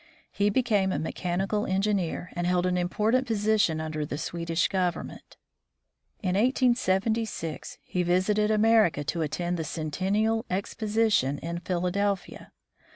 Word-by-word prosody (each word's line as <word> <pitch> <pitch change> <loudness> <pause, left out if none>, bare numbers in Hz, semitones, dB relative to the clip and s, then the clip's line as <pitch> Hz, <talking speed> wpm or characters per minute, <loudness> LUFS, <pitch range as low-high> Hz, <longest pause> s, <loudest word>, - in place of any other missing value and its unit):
He 205 0 +1
became 205 -4 +2
a - - -1
mechanical 185 +6 -2
engineer, 190 -2 -1
and 175 0 -2
held 180 0 +2
an 180 0 +1
important 215 +8 +1
position 210 -7 +2
under 155 -1 -3
the 145 -1 -4
Swedish 165 +1 -1
government. 180 -2 -3 0.9
In 185 - 0
1876 220 - 0
he 180 - -2
visited 185 +4 +2
America 215 -7 +3
to 165 +4 -2
attend 175 +3 -2
the 165 - -2
Centennial 195 +9 -1
Exposition 205 - 0
in 170 +2 -5
Philadelphia. 180 +2 -2
190 Hz, 120 wpm, -27 LUFS, 175-215 Hz, 0.9 s, America